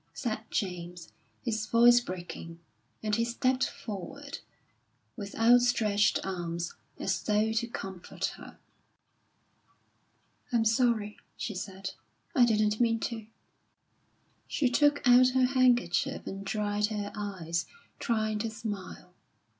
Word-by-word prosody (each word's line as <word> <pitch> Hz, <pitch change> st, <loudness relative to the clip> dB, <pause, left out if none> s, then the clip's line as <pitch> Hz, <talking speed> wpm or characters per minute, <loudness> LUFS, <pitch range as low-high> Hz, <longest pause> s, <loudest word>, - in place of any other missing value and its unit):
said 225 Hz, -4 st, -2 dB
James, 175 Hz, -3 st, -4 dB, 0.3 s
his 220 Hz, -2 st, -1 dB
voice 240 Hz, +1 st, +7 dB
breaking; 175 Hz, -5 st, -7 dB, 0.5 s
and 210 Hz, -1 st, +1 dB
he 230 Hz, -, +2 dB
stepped 255 Hz, +2 st, +1 dB
forward, 230 Hz, +8 st, -7 dB, 0.8 s
with 200 Hz, -3 st, -7 dB
outstretched 225 Hz, -3 st, +4 dB
arms, 170 Hz, -2 st, -3 dB, 0.2 s
as -, -, -1 dB
though 215 Hz, +1 st, +2 dB
to 230 Hz, +1 st, 0 dB
comfort 190 Hz, -6 st, -5 dB
her. -, -, -12 dB, 1.9 s
"I'm 230 Hz, -2 st, +2 dB
sorry," 220 Hz, -2 st, +2 dB, 0.2 s
she 215 Hz, -, -3 dB
said; 190 Hz, 0 st, -5 dB, 0.4 s
"I 255 Hz, -7 st, +6 dB
didn't 215 Hz, -2 st, +2 dB
mean 230 Hz, -1 st, +3 dB
to." 225 Hz, -3 st, -4 dB, 1.2 s
She 260 Hz, -5 st, +1 dB
took 290 Hz, +2 st, +3 dB
out 250 Hz, +1 st, +8 dB
her 255 Hz, -, +5 dB
handkerchief 245 Hz, -9 st, +2 dB
and 195 Hz, +1 st, -5 dB
dried 210 Hz, +1 st, 0 dB
her 210 Hz, -2 st, -4 dB
eyes, 185 Hz, -5 st, -3 dB, 0.3 s
trying 215 Hz, -2 st, 0 dB
to 225 Hz, +1 st, -1 dB
smile. 220 Hz, -4 st, -7 dB
215 Hz, 115 wpm, -30 LUFS, 195-240 Hz, 1.9 s, out